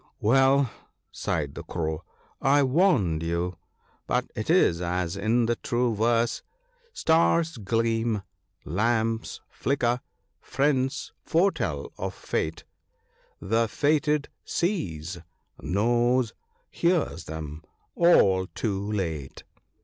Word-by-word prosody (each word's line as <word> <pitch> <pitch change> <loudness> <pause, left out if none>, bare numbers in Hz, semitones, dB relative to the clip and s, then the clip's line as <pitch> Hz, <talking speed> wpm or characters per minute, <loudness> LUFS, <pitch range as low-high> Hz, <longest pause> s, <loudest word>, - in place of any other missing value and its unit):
" - - -46
Well," 135 +2 +4 0.4
sighed 75 -3 -2
the - - -7
Crow, 80 0 -3 0.2
" - - -36 0.2
I 145 - +5
warned 130 - +3
you; 85 +1 -2 0.5
but - - 0
it - - -4
is 85 +1 +4
as 90 0 -1
in 110 +4 +2
the 120 0 0
true 120 -1 0
verse, 115 +2 +1 0.2
— - - -42
" - - -33
Stars 165 - +2
gleam, 115 0 0 0.4
lamps 115 +5 0
flicker, 125 -2 0 0.4
friends 135 -1 0
foretell 155 - 0
of - - -3
fate; 80 +1 -3 0.8
The 115 +4 +1
fated 150 +3 +1 0.2
sees, 90 - -2 0.4
knows, 120 - +2 0.4
hears 170 - 0
them 80 0 -7 0.2
— - - -42
all 95 - +4
too 100 -2 -2
late." 80 -9 -3
115 Hz, 110 wpm, -26 LUFS, 90-135 Hz, 0.8 s, I